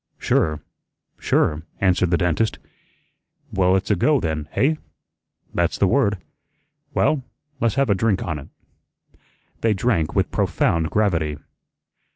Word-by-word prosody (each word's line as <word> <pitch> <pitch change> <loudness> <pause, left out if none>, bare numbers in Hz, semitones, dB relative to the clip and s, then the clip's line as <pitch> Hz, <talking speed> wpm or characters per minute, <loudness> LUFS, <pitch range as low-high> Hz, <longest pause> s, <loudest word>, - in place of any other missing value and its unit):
"Sure, 75 -2 +1 0.6
sure," 75 0 +1 0.2
answered 90 -2 +2
the 85 - +3
dentist. 90 +5 0 1.0
"Well, 95 -1 +3
it's 95 +2 0
a - - +4
go 145 - +3
then, 80 -4 -3
hey?" 155 +3 +2 0.7
"That's 85 +1 0
the - - +3
word." 100 -1 +2 0.8
"Well, 150 -3 +2 0.4
le's 115 -4 +1
have 135 -5 +2
a - - +6
drink 100 0 +1
on 80 -3 -3
it." 70 - -11 1.1
They 110 -2 +2
drank 95 -7 0
with - - +1
profound 80 -1 +1
gravity. 80 -9 0
95 Hz, 130 wpm, -22 LUFS, 80-110 Hz, 1.1 s, a